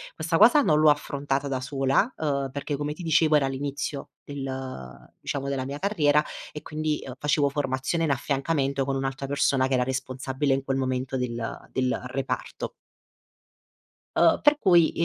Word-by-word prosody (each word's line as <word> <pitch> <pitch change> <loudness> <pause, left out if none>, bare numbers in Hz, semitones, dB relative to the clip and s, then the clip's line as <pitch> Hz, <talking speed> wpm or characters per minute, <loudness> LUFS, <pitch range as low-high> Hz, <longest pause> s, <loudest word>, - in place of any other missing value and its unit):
questa 165 +1 0
cosa 290 - +7
non 155 - +3
l'ho 155 -1 +6
affrontata 140 -1 0
da 130 -1 -1
sola, 135 - +1
uhm, 140 -3 -1
perché 140 0 -3
come 150 +1 -2
ti 175 - -9
dicevo 160 -1 +3
era 140 -2 +3
all'inizio 140 +1 -4
del 130 - -7
diciamo 140 -1 -3
della 130 -2 -2
mia 140 +2 -5
carriera 150 -7 +3 0.3
e 150 - -6
quindi, 155 -1 -2
uhm, 130 -1 -7
facevo 145 -1 +2
formazione 140 +3 -1
in 145 - +1
affiancamento 140 0 0
con 135 0 -1
un'altra 135 0 -3
persona 135 -1 +2
che 135 - -2
era 125 -1 +3
responsabile, 130 +2 -2
in 135 - -1
quel 135 0 -1
momento, 130 0 -1
del 120 -2 -4
del 130 -1 0
reparto. 135 +1 -4 1.4
Uhm, - - +4
per 295 0 +5
cui, 175 - +5
140 Hz, 165 wpm, -26 LUFS, 130-150 Hz, 1.4 s, cosa